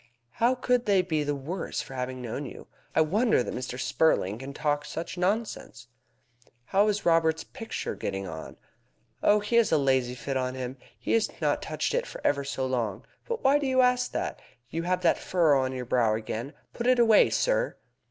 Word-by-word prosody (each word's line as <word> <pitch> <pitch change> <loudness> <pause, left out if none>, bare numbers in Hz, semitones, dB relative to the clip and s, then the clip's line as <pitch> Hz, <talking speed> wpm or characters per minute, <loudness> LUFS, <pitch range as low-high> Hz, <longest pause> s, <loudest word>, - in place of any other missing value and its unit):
How 240 - +2
could 250 -1 +1
they 195 -3 +4
be 160 -4 0
the 145 0 -1
worse 160 +7 -4
for - - -11
having 130 0 -4
known 135 +4 -4
you? - - -10 0.3
I - - +5
wonder 200 - +3
that - - -5
Mr. 125 0 -5
Spurling 110 -9 +1
can 135 +1 -7
talk 145 0 -1
such 165 +4 -5
nonsense!" 180 - -2 0.8
"How 200 +2 +3
is 210 -1 -1
Robert's 160 -1 +3
picture 225 - -5
getting 95 -1 -4
on?" 80 -2 -8 0.6
"Oh, 210 0 +4
he 210 +3 +1
has 235 - +4
a 160 - +5
lazy 130 -3 +1
fit 135 +2 -3
on 130 0 -2
him. 130 0 -5 0.2
He - - -4
has 225 -1 +3
not - - +1
touched - - -2
it - - 0
for - - -8
ever 140 -1 +2
so 135 -1 -2
long. 120 -6 -2 0.2
But 470 -1 -3
why 280 +2 +5
do 285 - -1
you 260 0 +4
ask 250 0 +2
that? - - -3 0.3
You 165 - -2
have 180 +1 -1
that 170 - +3
furrow 160 -7 +3
on 130 0 -1
your 130 -1 -4
brow 115 -3 +2
again. 115 +5 -5 0.2
Put 235 - -3
it 255 0 +5
away, 225 -3 +6
sir!" - - +1
160 Hz, 200 wpm, -27 LUFS, 130-215 Hz, 0.8 s, away